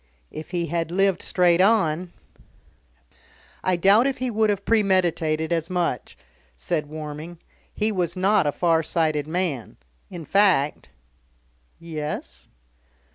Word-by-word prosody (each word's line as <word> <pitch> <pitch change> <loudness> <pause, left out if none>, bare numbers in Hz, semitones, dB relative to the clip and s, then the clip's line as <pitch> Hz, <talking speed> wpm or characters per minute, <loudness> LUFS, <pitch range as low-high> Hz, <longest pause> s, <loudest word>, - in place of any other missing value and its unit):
If 155 - -8
he 175 -1 -2
had 165 0 -2
lived 195 +1 +1
straight 180 -1 +2
on 185 -5 +2 0.8
" - - -40 0.7
"I 185 - +2
doubt 200 +8 +4
if 275 - -2
he 255 -1 -2
would 220 0 +2
have 200 -1 -1
premeditated 175 -7 +1
as 165 -1 -2
much," 175 - -2 0.4
said 150 - -2
Warming. 155 +2 -7 0.3
"He 215 +1 -1
was 175 -3 -1
not 190 -2 +2
a - - +2
far 165 +1 +2
sighted 155 -2 0
man. 160 -8 -3 0.3
In 170 -4 -8
fact 180 - +2 0.5
" - - -40
"Yes?" 150 - -6
170 Hz, 130 wpm, -23 LUFS, 155-190 Hz, 0.8 s, doubt